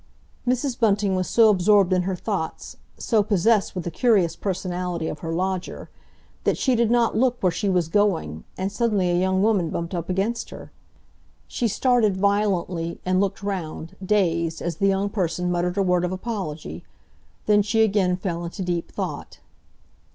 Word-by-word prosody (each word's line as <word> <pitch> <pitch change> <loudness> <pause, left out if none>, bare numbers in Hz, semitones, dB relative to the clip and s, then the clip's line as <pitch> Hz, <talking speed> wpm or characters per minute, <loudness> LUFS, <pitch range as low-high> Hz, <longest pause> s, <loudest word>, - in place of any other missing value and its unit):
Mrs. 255 +1 0
Bunting 205 -3 +2
was 185 -1 -1
so 225 -2 +5
absorbed 195 -1 +4
in 180 - +3
her 185 +1 -2
thoughts, 185 -4 -4 0.2
so 225 -3 +2
possessed 205 +1 +2
with 180 - -3
the 170 - -4
curious 195 -4 +2
personality 180 -3 -3
of 150 - -5
her 165 - -5
lodger, 185 +1 -3 0.5
that - - +1
she 260 - +1
did 235 -2 +2
not 235 -1 +2
look 250 +1 +2
where 185 - +3
she 195 +4 -1
was 180 -4 +1
going, 165 - 0
and 190 +1 -2
suddenly 210 -5 +1
a - - +1
young 190 +1 +1
woman 200 -7 +2
bumped 170 +3 -4
up 170 -1 -4
against 200 +6 -1
her. - - -11 0.8
She 240 - -1
started 225 -3 +2
violently 190 -4 0
and 185 +1 +2
looked 200 0 -2
round, 180 -3 -4
dazed, 170 -5 +1
as 170 -2 -4
the 195 - +2
young 195 +1 +1
person 180 -3 -1
muttered 175 +1 -1
a 200 - +3
word 180 -1 +2
of 180 - -1
apology;—then 195 +1 -4
she 220 +2 +2
again 195 -4 +2
fell 175 -2 -3
into 175 +3 -5
deep 175 -2 -2
thought. - - -5
190 Hz, 170 wpm, -23 LUFS, 175-210 Hz, 0.8 s, so